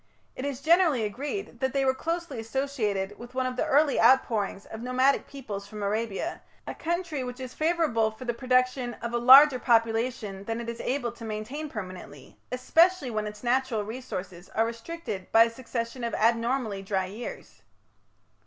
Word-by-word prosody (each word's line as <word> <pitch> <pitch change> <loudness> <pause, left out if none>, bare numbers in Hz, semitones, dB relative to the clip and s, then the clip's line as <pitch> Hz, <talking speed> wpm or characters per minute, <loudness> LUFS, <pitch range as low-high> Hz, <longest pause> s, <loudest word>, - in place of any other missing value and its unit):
It 255 - -5
is 280 -2 -4
generally 325 -7 +4
agreed 270 - -4
that 265 0 -1
they 275 -1 +1
were 260 - +3
closely 330 -2 -3
associated 220 -5 -2
with 240 +1 -11
one 260 0 0
of 255 0 -2
the - - -1
early 290 0 +3
outpourings 225 -5 +3
of 220 - -8
nomadic 255 +3 +2
peoples 210 -8 -7
from 210 -1 -7
Arabia, 220 - -2 0.2
a - - -5
country 335 -4 -2
which 250 +1 -6
is 255 -1 -7
favourable 310 -9 +1
for 220 +4 -11
the 240 - 0
production 255 0 +1
of 235 0 -6
a 240 - +1
larger 265 +2 +8
population 225 -4 +1
than 225 +1 -3
it 235 0 -5
is 235 0 -5
able 250 -3 -1
to 235 0 -13
maintain 225 +8 -5
permanently, 185 - -9 0.2
especially 320 +3 +3
when 215 -1 -2
its 210 +1 -9
natural 250 -3 +1
resources 195 -6 -7
are 225 - +3
restricted 230 - -6
by 225 - +8
a 230 - -1
succession 235 0 -5
of 235 - -2
abnormally 230 -2 +1
dry 195 -1 -1
years. 210 +6 -8
240 Hz, 170 wpm, -27 LUFS, 220-270 Hz, 0.2 s, larger